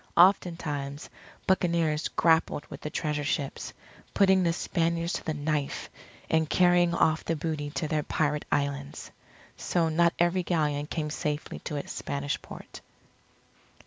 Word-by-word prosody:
Oftentimes, 165 Hz, -6 st, +2 dB, 0.3 s
buccaneers 170 Hz, -4 st, +1 dB
grappled 160 Hz, -2 st, +2 dB
with -, -, -8 dB
the 150 Hz, -, -4 dB
Treasure 150 Hz, -1 st, -2 dB
Ships, 140 Hz, -1 st, -2 dB, 0.4 s
putting 190 Hz, -1 st, +5 dB
the 170 Hz, -2 st, +2 dB
Spaniards 170 Hz, 0 st, -1 dB
to -, -, -3 dB
the 155 Hz, -, -2 dB
knife, 145 Hz, -1 st, -2 dB, 0.4 s
and 160 Hz, -1 st, +1 dB
carrying 175 Hz, -1 st, +4 dB
off 160 Hz, -1 st, +2 dB
the 165 Hz, -, -1 dB
booty 150 Hz, -1 st, -3 dB
to 155 Hz, +2 st, -3 dB
their 155 Hz, -1 st, 0 dB
pirate 150 Hz, 0 st, -1 dB
islands. 140 Hz, 0 st, -2 dB, 0.5 s
So 170 Hz, -2 st, +1 dB
not 170 Hz, +2 st, +3 dB
every 175 Hz, +2 st, +2 dB
Galleon 150 Hz, -4 st, 0 dB
came 150 Hz, -1 st, -3 dB
safely 150 Hz, 0 st, -3 dB
to 150 Hz, -, -3 dB
its 145 Hz, -, -4 dB
Spanish 140 Hz, 0 st, -3 dB
port. -, -, -11 dB
160 Hz, 140 wpm, -28 LUFS, 145-170 Hz, 0.5 s, putting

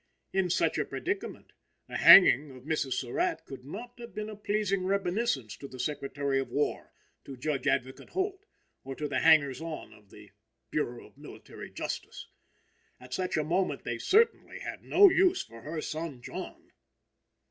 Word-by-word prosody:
In 190 Hz, -1 st, +1 dB
such 175 Hz, -, +1 dB
a -, -, 0 dB
predicament, 380 Hz, +2 st, -5 dB, 0.3 s
the -, -, -4 dB
hanging 150 Hz, -6 st, +8 dB
of 130 Hz, -2 st, -13 dB
Mrs. 145 Hz, -3 st, -1 dB
Surratt 345 Hz, -, -1 dB
could 135 Hz, -2 st, -10 dB
not 240 Hz, -, -9 dB
have 235 Hz, 0 st, -10 dB
been 215 Hz, 0 st, -4 dB
a -, -, -8 dB
pleasing 205 Hz, -2 st, -1 dB
reminiscence 190 Hz, -, -1 dB
to 140 Hz, -, -8 dB
the 130 Hz, -, -11 dB
Secretary 140 Hz, 0 st, -1 dB
of 135 Hz, -, -3 dB
War, 145 Hz, -, -2 dB, 0.3 s
to 135 Hz, -, -9 dB
Judge 135 Hz, 0 st, -2 dB
Advocate 130 Hz, -1 st, -1 dB
Holt, 385 Hz, +1 st, -3 dB, 0.4 s
or 135 Hz, 0 st, -6 dB
to 150 Hz, -, -3 dB
the -, -, -1 dB
hangers 150 Hz, -4 st, +4 dB
on 165 Hz, -2 st, -7 dB
of 105 Hz, -2 st, -20 dB
the 105 Hz, -1 st, -15 dB, 0.4 s
Bureau 120 Hz, -5 st, -2 dB
of -, -, -20 dB
Military -, -, -11 dB
Justice. -, -, -6 dB, 0.7 s
At 125 Hz, 0 st, -11 dB
such 185 Hz, +4 st, -1 dB
a 155 Hz, -, +1 dB
moment 170 Hz, -2 st, -1 dB
they 120 Hz, -1 st, -3 dB
certainly 455 Hz, -, +2 dB
had -, -, -6 dB
no 405 Hz, -, +7 dB
use 370 Hz, 0 st, +3 dB
for 115 Hz, 0 st, -14 dB
her 155 Hz, +5 st, -5 dB
son 155 Hz, -6 st, -5 dB
John. -, -, -8 dB
155 Hz, 170 wpm, -29 LUFS, 135-210 Hz, 0.7 s, hanging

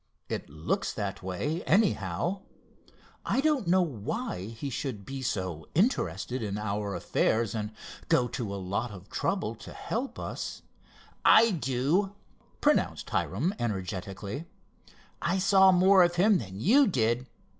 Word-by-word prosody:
"It -, -, -4 dB
looks 75 Hz, +2 st, -2 dB
that 100 Hz, -2 st, -4 dB
way, 95 Hz, -, -2 dB
anyhow. 180 Hz, -, +1 dB, 0.8 s
I -, -, 0 dB
don't 280 Hz, -, +2 dB
know 185 Hz, +1 st, +4 dB
why 135 Hz, -, -4 dB
he 115 Hz, +5 st, -6 dB
should 115 Hz, -5 st, -4 dB
be 135 Hz, 0 st, -5 dB
so 95 Hz, -, -3 dB
interested 130 Hz, -, +1 dB
in 105 Hz, -2 st, -3 dB
our 105 Hz, -1 st, -2 dB
affairs 110 Hz, -2 st, +1 dB
and 105 Hz, -1 st, -3 dB, 0.4 s
go 125 Hz, -, +4 dB
to 115 Hz, -7 st, -4 dB
a 100 Hz, -, -3 dB
lot 100 Hz, +5 st, -2 dB
of 100 Hz, -2 st, -12 dB
trouble 185 Hz, -, -1 dB
to -, -, -10 dB
help 255 Hz, +4 st, -4 dB
us——" -, -, -5 dB, 0.6 s
"I 230 Hz, +1 st, +7 dB
do," 160 Hz, +6 st, 0 dB, 0.5 s
pronounced -, -, +1 dB
Hiram 145 Hz, -, 0 dB
energetically. 100 Hz, -, -4 dB, 0.8 s
"I 180 Hz, +3 st, +1 dB
saw 190 Hz, 0 st, +6 dB
more 185 Hz, +1 st, +6 dB
of 175 Hz, 0 st, +3 dB
him 195 Hz, +2 st, +4 dB
than 95 Hz, -2 st, -7 dB
you 255 Hz, -, +5 dB
did. 120 Hz, -, +1 dB
125 Hz, 135 wpm, -29 LUFS, -, 0.8 s, I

